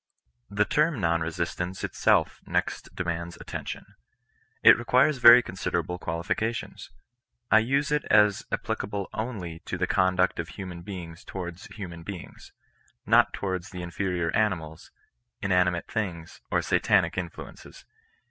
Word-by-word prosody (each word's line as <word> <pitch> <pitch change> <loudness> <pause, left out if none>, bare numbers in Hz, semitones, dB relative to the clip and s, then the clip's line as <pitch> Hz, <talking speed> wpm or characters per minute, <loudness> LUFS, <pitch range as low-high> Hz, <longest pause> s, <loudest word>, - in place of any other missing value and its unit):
The 105 +1 +1
term 150 0 +1
non 85 -2 +1
resistance 85 +3 -3
itself - - +2
next - - -2
demands 85 -1 -3
attention. - - -6 0.8
It - - +10
requires 130 +4 +2
very 120 0 +9
considerable 90 -1 -3
qualifications. 100 +8 -3 0.6
I 110 - +8
use 140 +6 0
it 150 0 +1
as 105 -2 +4
applicable 100 -1 -3
onli/ 95 -8 -5
to 95 - -4
the 90 - +1
conduct 95 0 +2
of 85 - -3
human 90 -2 -8
beings 85 -3 -8
towards 90 0 -7
human 90 -5 -8
beings 90 0 -9 0.3
— - - -37
not - - +5
towards 95 -2 -4
the 90 -1 -7
inferior 85 -1 -2
animals, 80 -8 -1 0.5
inani 90 -2 +3
mate 85 0 -5
things, 90 -6 -4
or - - +1
satanic - - +2
influences. - - -8
95 Hz, 130 wpm, -27 LUFS, 85-105 Hz, 0.8 s, It